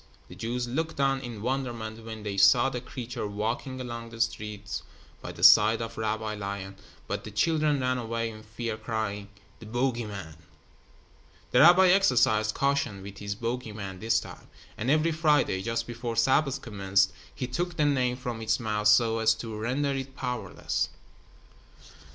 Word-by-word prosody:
The -, -, -10 dB
Jews 120 Hz, +2 st, -3 dB
looked 160 Hz, +5 st, -3 dB
on 135 Hz, -1 st, +2 dB
in 120 Hz, -5 st, -7 dB
wonderment 120 Hz, -4 st, -3 dB
when 110 Hz, -1 st, -8 dB
they 100 Hz, -2 st, -3 dB
saw 120 Hz, +7 st, +5 dB
the 125 Hz, -, -4 dB
creature 125 Hz, -3 st, -5 dB
walking 115 Hz, +5 st, -3 dB
along 115 Hz, -2 st, -6 dB
the 115 Hz, 0 st, -11 dB
street 105 Hz, -3 st, -3 dB, 0.4 s
by -, -, -6 dB
the -, -, -9 dB
side 110 Hz, +2 st, +8 dB
of 115 Hz, 0 st, -5 dB
Rabbi 110 Hz, 0 st, -2 dB
Lion, 100 Hz, -2 st, -5 dB, 0.3 s
but -, -, -4 dB
the -, -, -7 dB
children 150 Hz, +6 st, +1 dB
ran 130 Hz, 0 st, 0 dB
away 115 Hz, -1 st, -2 dB
in 110 Hz, 0 st, -11 dB
fear, 110 Hz, +1 st, -5 dB
crying: 110 Hz, -2 st, -3 dB, 0.3 s
"The 110 Hz, -, -11 dB
bogey 120 Hz, 0 st, -1 dB
man." 95 Hz, -7 st, -8 dB, 1.1 s
The 125 Hz, -, +4 dB
rabbi 180 Hz, +5 st, +8 dB
exercised 125 Hz, -, +3 dB
caution 140 Hz, -8 st, 0 dB
with 100 Hz, 0 st, -9 dB
his 100 Hz, 0 st, -4 dB
bogey 115 Hz, +1 st, -4 dB
man 95 Hz, -3 st, -7 dB
this 110 Hz, +2 st, +2 dB
time, -, -, -11 dB, 0.3 s
and 115 Hz, +4 st, -3 dB
every 155 Hz, +3 st, +3 dB
Friday, 150 Hz, -, +2 dB
just 115 Hz, +3 st, -2 dB
before 120 Hz, 0 st, -5 dB
Sabbath 135 Hz, +4 st, +2 dB
commenced, 100 Hz, -3 st, +1 dB, 0.2 s
he 130 Hz, -, -3 dB
took 170 Hz, +7 st, -3 dB
the 150 Hz, -, +3 dB
name 130 Hz, -4 st, +1 dB
from 120 Hz, -3 st, -5 dB
its 110 Hz, +2 st, +1 dB
mouth 105 Hz, -2 st, 0 dB
so 115 Hz, +2 st, +4 dB
as 110 Hz, 0 st, +4 dB
to 110 Hz, -1 st, -6 dB
render 130 Hz, +6 st, -1 dB
it 135 Hz, -1 st, -4 dB
powerless. 125 Hz, -4 st, -2 dB
115 Hz, 170 wpm, -28 LUFS, 110-130 Hz, 1.1 s, side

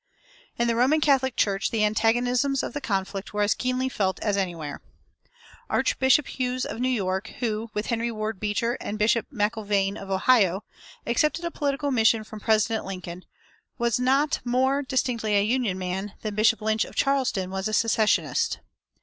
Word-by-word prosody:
In 235 Hz, -, +1 dB
the 230 Hz, -, +1 dB
Roman 260 Hz, +7 st, +3 dB
Catholic 270 Hz, -4 st, +2 dB
Church 195 Hz, 0 st, +1 dB
the 215 Hz, -2 st, +1 dB
antagonisms 245 Hz, +5 st, +1 dB
of -, -, -4 dB
the 290 Hz, -, -4 dB
conflict 195 Hz, -3 st, -3 dB
were 210 Hz, -, +2 dB
as 205 Hz, -, +3 dB
keenly 255 Hz, +1 st, -1 dB
felt 195 Hz, -7 st, -1 dB
as 205 Hz, -2 st, 0 dB
anywhere. 170 Hz, -7 st, -3 dB, 0.9 s
Archbishop 265 Hz, +2 st, +3 dB
Hughes 255 Hz, -1 st, -2 dB
of -, -, -6 dB
New 255 Hz, +1 st, +1 dB
York, 190 Hz, -3 st, -1 dB
who, 225 Hz, -2 st, -2 dB
with 210 Hz, +1 st, -1 dB
Henry 235 Hz, 0 st, -1 dB
Ward 215 Hz, -2 st, -4 dB
Beecher 215 Hz, +4 st, -1 dB
and 210 Hz, -, -4 dB
Bishop 225 Hz, +2 st, +2 dB
McIlvaine 205 Hz, -3 st, 0 dB
of 195 Hz, -, -9 dB
Ohio, 195 Hz, -1 st, +3 dB, 0.4 s
accepted 305 Hz, +8 st, +1 dB
a 340 Hz, -, -2 dB
political 285 Hz, -1 st, -1 dB
mission 225 Hz, -2 st, +3 dB
from 215 Hz, 0 st, -10 dB
President 220 Hz, +1 st, +1 dB
Lincoln, 180 Hz, -2 st, -7 dB, 0.5 s
was 235 Hz, -1 st, +1 dB
not 270 Hz, +4 st, +2 dB
more 260 Hz, +3 st, +1 dB
distinctly 250 Hz, -6 st, -1 dB
a 200 Hz, -, +4 dB
Union 225 Hz, -4 st, 0 dB
man 190 Hz, +2 st, -4 dB
than 215 Hz, -1 st, -3 dB
Bishop 220 Hz, +2 st, +3 dB
Lynch 220 Hz, 0 st, +1 dB
of -, -, -10 dB
Charleston 260 Hz, -9 st, 0 dB
was 190 Hz, +1 st, -2 dB
a -, -, -3 dB
secessionist. 220 Hz, -1 st, +2 dB
225 Hz, 165 wpm, -25 LUFS, 205-255 Hz, 0.9 s, a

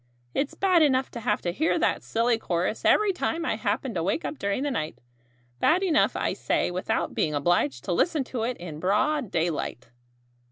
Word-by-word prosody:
It's 275 Hz, 0 st, -1 dB
bad 370 Hz, -3 st, +3 dB
enough 265 Hz, -3 st, +2 dB
to 235 Hz, -, -6 dB
have 210 Hz, -2 st, -1 dB
to 175 Hz, -, 0 dB
hear 315 Hz, -, +1 dB
that -, -, +1 dB
silly 230 Hz, 0 st, +1 dB
chorus 180 Hz, +2 st, -2 dB
every 420 Hz, -2 st, +4 dB
time 335 Hz, -2 st, -2 dB
I -, -, 0 dB
happen 225 Hz, +3 st, -2 dB
to 170 Hz, -, -1 dB
wake 195 Hz, -, -1 dB
up 300 Hz, -, -5 dB
during 200 Hz, +6 st, -1 dB
the 290 Hz, -, -1 dB
night 155 Hz, -10 st, -3 dB, 0.6 s
bad 350 Hz, -, +3 dB
enough, 330 Hz, -5 st, +3 dB
I -, -, 0 dB
say, -, -, 0 dB
without 185 Hz, +1 st, -1 dB
being 150 Hz, -1 st, 0 dB
obliged 145 Hz, -4 st, +1 dB
to -, -, -3 dB
listen 305 Hz, -, +1 dB
to 250 Hz, -2 st, -5 dB
it 240 Hz, +2 st, -2 dB
in 165 Hz, -4 st, -8 dB
broad 210 Hz, -, +1 dB
daylight." 160 Hz, -8 st, -2 dB
225 Hz, 195 wpm, -26 LUFS, 175-295 Hz, 0.6 s, every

